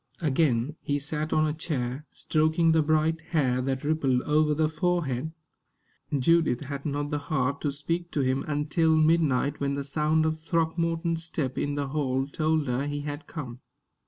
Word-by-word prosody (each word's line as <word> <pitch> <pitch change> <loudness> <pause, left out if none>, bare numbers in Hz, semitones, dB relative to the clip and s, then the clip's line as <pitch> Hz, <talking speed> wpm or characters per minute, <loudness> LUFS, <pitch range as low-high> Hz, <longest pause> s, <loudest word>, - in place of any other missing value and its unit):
Again, 150 -3 +1
he 145 - -1
sat 150 +2 -3
on 155 - +3
a 150 - 0
chair, 145 -3 -3
stroking 160 +1 +2
the 160 0 +4
bright 155 +1 +1
hair 135 -7 0
that 135 0 -2
rippled 140 -5 +1
over 150 0 +2
the 155 +1 +2
forehead. 160 -4 -1 0.9
Judith 160 -2 +3
had 140 0 -5
not 145 +1 -2
the 150 - 0
heart 140 -2 -1
to 145 - 0
speak 165 +5 -3
to 145 - +1
him 130 0 +1
until 155 +2 +2
midnight, 155 -3 +2
when 140 0 0
the 140 - -3
sound 155 +2 +1
of 160 0 -1
Throckmorton's 165 0 0
step 145 -5 -3
in 145 0 -1
the 140 -1 -2
hall 135 -2 0
told 155 +1 0
her 125 +3 -1
he 145 0 -3
had 145 +1 -6
come. 130 -6 -7
150 Hz, 170 wpm, -27 LUFS, 140-160 Hz, 0.9 s, the